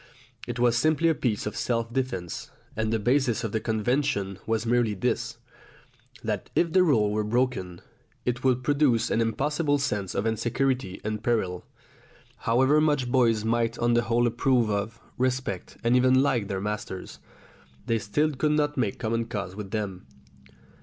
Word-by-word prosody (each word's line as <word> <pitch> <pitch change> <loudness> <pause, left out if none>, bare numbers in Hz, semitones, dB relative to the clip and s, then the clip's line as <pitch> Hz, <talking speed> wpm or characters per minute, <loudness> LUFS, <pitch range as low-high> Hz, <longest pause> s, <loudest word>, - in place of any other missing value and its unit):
It 120 0 -4
was 120 -1 +3
simply 155 +4 +3
a - - +4
piece 120 -8 -1
of 105 - -4
self 115 -1 -1
defence, 120 -10 -3 0.3
and 110 0 -1
the 115 - +2
basis 120 +1 +1
of 110 - -2
the 110 - 0
convention 110 -3 -1
was 115 0 0
merely 115 -2 +2
this, 95 - -1 0.9
that, - - -3
if 170 -2 +2
the 185 - +6
rule 115 -12 +3
were 105 0 0
broken, 105 -6 -1 0.4
it 125 0 -1
would 130 -1 +2
produce 140 -5 +2
an 115 - +2
impossible 145 +6 +1
sense 105 -10 -2
of 100 - 0
insecurity 120 -1 -1
and 110 0 -3
peril. 95 -7 -1 0.8
However 130 +6 +4
much 145 -5 +1
boys 115 -4 +3
might 115 0 +1
on 120 0 +2
the 120 - +4
whole 120 +1 +2
approve 120 -1 +2
of, 105 +3 -2 0.2
respect, 130 -7 -2
and 120 +1 +3
even 130 +1 +5
like 120 -7 +1
their 95 -2 -2
masters, 105 -2 -5 0.8
still 145 +10 +1
they 145 - -7
could 150 +2 +2
not 150 -1 0
make 110 -6 0
common 115 0 -1
cause 100 -4 -5
with 105 -2 -6
them. 100 -7 -4
120 Hz, 165 wpm, -26 LUFS, 105-130 Hz, 0.9 s, the